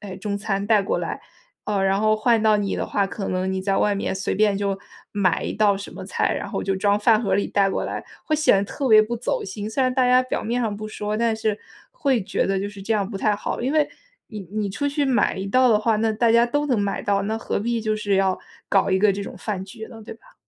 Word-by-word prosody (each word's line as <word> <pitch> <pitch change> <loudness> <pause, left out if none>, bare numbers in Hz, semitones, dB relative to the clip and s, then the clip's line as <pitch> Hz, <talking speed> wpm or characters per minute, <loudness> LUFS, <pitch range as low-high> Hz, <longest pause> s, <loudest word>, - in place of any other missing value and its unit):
哎， 195 -3 -8
中 200 +1 -3
餐 200 -1 -2
带 215 -1 +4
过 195 - -1
来。 - - -4 0.4
呃， 205 -2 0
然 195 +1 +2
后 215 0 +3
换 225 +1 +3
到 215 -1 +4
你 200 -1 -1
的 - - -2
话， 200 - 0
可 195 0 -5
能 185 +1 -1
你 190 - -2
在 195 +1 0
外 205 - +2
面 195 -1 -2
随 190 - -2
便 210 -1 +3
就 200 -1 -1 0.3
买 195 -4 +1
一 - - -3
道 205 -2 +3
什 200 - -8
么 - - -9
菜， - - 0
然 - - -4
后 - - -3
就 195 -1 -1
装 205 +1 +2
饭 215 0 +4
盒 220 - -1
儿 - - +5
里 200 - 0
带 200 -1 +2
过 - - -2
来， - - -5 0.2
会 310 - +1
显 295 -9 +4
得 195 - +1
特 275 +7 -4
别 215 -1 +8
不 235 +2 -3
走 240 - -2
心。 205 +2 -5
虽 260 +4 0
然 255 0 +2
大 255 -1 +2
家 250 +1 +5
表 255 - -3
面 240 +2 -1
上 215 -3 -1
不 215 +1 -6
说， 210 0 -3
但 230 0 +1
是 215 -1 -1 0.3
会 275 - 0
觉 - - -1
得 195 0 0
就 200 - -3
是 205 -1 -11
这 220 +3 -2
样 205 -2 0
不 195 - -5
太 210 +1 +2
好。 205 - -4
因 255 +3 -1
为 305 -1 +2 0.4
你 215 - -7
你 210 -2 -2
出 285 +8 -1
去 285 0 0
买 260 -7 +2
一 190 - -4
道 255 +5 +4
的 220 - +5
话， 215 0 +1
那 220 0 +1
大 230 +1 +2
家 235 +1 +5
都 290 +4 -1
能 255 -6 +1
买 200 -1 -2
到， 200 -1 +1
那 220 +3 -2
何 225 - -2
必 230 +2 -1
就 215 -1 -1
是 205 -2 0
要 190 -1 +2 0.3
搞 195 - +3
一 190 - +3
个 205 0 +4
这 200 - -4
种 - - -8
饭 195 -3 -4
局 220 +3 -9
呢， 225 - -11
对 - - -8
吧？ - - -22
210 Hz, 300 characters per minute, -23 LUFS, 200-230 Hz, 0.4 s, 别